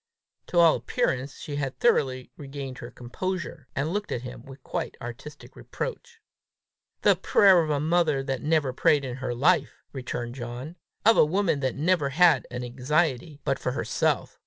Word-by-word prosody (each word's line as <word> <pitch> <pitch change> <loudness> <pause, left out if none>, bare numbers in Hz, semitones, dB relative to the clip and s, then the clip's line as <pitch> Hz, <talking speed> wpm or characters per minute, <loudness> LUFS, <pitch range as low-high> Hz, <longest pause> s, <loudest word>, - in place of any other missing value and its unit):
To 175 - -3
all 170 -2 +6
appearance 135 - -1
she 145 -3 -6
had 135 -2 -3
thoroughly 130 - +1
regained 135 -2 -7
her - - -7
composure, 150 +3 -5
and 150 +5 -1
looked 205 0 -3
at 120 - -3
him 125 -1 -8
with 135 0 -11
a - - -42
quite - - -4
artistic 120 +5 -9
reproach. 475 -2 -6 0.8
"The - - +6
prayer 190 -4 +5
of 155 - -2
a 145 -1 +1
mother 155 -3 +2
that 135 -1 -3
never 150 -4 +1
prayed 140 +2 +3
in 125 -1 -5
her 130 -2 -3
life!" 145 0 +2
returned 120 -3 -4
John; 125 +5 -7 0.2
" - - -42
of 225 +1 +6
a - - +8
woman 165 -1 +1
that 130 -2 -1
never 155 -1 +1
had 160 -2 +4
an 125 0 -5
anxiety 140 +3 -1
but - - 0
for - - -2
herself! - - -1
140 Hz, 180 wpm, -26 LUFS, 130-170 Hz, 0.8 s, a